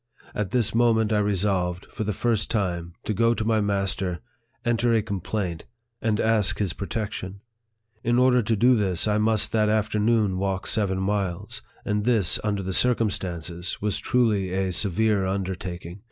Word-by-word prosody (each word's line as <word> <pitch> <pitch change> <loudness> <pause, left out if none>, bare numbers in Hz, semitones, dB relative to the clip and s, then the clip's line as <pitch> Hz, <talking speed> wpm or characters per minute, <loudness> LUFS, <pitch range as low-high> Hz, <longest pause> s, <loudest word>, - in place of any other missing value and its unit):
At 105 -3 -2
this 120 0 0
moment 110 -2 +3
I 105 - +3
resolved, 95 -3 0
for - - -5
the 105 - -1
first 110 +1 0
time, 85 -6 -2
to 110 - -2
go 115 +2 +2
to 110 - -2
my 110 -1 +2
master, 100 -3 -1 0.5
enter 120 0 +2
a 110 - +2
complaint, 95 -3 -3 0.4
and 110 -1 0
ask 105 -2 +2
his 100 -5 -1
protection. 100 -1 -5 0.6
In 120 +1 +2
order 125 0 +4
to 115 +1 0
this, 105 -6 +2
I 105 0 +2
must 110 0 +2
that 105 -1 +2
afternoon 105 -2 +1
walk 95 -1 -2
seven 100 -3 0
miles; 95 -3 -2 0.2
and 105 0 0
this, 110 -6 +3
under 100 -2 -1
the 95 +1 -3
cir 125 +6 +4
cumstances, 90 -5 -3
was 105 -1 -1
truly 105 -7 +1
a 95 0 0
severe 100 +2 +1
undertaking. 95 -2 -4
105 Hz, 160 wpm, -25 LUFS, 95-110 Hz, 0.6 s, order